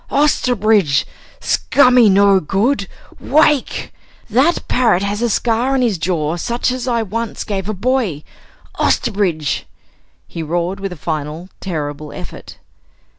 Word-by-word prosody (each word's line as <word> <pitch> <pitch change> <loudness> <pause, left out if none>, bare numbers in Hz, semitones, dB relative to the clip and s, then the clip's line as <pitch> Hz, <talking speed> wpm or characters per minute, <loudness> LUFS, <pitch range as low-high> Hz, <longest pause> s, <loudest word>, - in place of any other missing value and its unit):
"Osterbridge! 220 - +2 0.3
Scummy 240 - +4
no 200 0 +5
good! 200 - 0 0.3
Wake! 295 -1 +1 0.4
That 275 +10 +2
parrot 225 -7 +2
has 205 +2 -2
a 240 - +1
scar 235 +4 +1
on 260 - +2
his 215 -8 0
jaw 160 -2 -1
such 235 +7 -1
as 255 0 -4
I 235 -2 +1
once 225 +2 -4
gave 195 -1 -4
a - - -1
boy! 215 - -1 0.6
Osterbridge!" 180 -9 0 0.6
he 165 - -6
roared 175 +4 -2
with 195 -1 -4
a - - -6
final 155 +3 -4
terrible 150 -4 -5
effort. - - -10
200 Hz, 125 wpm, -17 LUFS, 170-240 Hz, 0.6 s, no